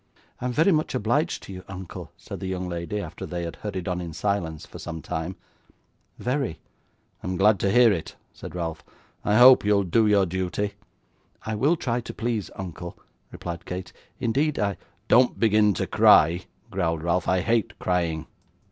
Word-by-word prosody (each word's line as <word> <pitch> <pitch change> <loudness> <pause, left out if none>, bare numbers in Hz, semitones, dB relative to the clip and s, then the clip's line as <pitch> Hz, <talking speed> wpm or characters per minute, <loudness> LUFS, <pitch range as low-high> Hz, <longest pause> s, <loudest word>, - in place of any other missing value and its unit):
'I - - -5
am - - -1
very 160 +9 +4
much 155 -5 +1
obliged 130 +8 0
to 95 - -9
you, 90 0 -8
uncle,' 95 -2 -8
said - - -8
the 95 - -4
young 95 -1 -3
lady, 85 +4 -3
after - - -6
they 85 -1 -4
had 85 -1 -5
hurried 95 -4 -5
on 90 -1 -1
in 85 -2 -6
silence 85 -5 -2
for - - -11
some 80 -1 -6
time; 85 +2 -4 0.8
'very.' 125 - -2 0.6
'I'm 90 0 -3
glad 105 +1 +4
to 100 - +1
hear 120 +1 +6
it,' 85 - -5 0.2
said - - -9
Ralph. 80 -3 -4 0.4
'I 105 - +2
hope 125 +1 +9
you'll 100 -1 +3
do 105 +5 +3
your 100 -2 +4
duty.' 95 +3 -2 0.7
'I 110 - -2
will 140 +11 +3
try 120 -6 -1
to - - -8
please, 115 -3 -2
uncle,' 85 -2 -7 0.3
replied 85 -1 -6
Kate: 90 0 -5 0.3
'indeed 140 +5 +1
I 100 -2 0 0.2
' - - -40
'Don't 125 +1 +4
begin 105 -2 +4
to - - -1
cry,' 85 +4 +5 0.3
growled 85 -4 -1
Ralph; 85 +1 0
'I 90 0 +2
hate 115 +1 0
crying. 85 -3 -1
95 Hz, 180 wpm, -25 LUFS, 85-115 Hz, 0.8 s, hope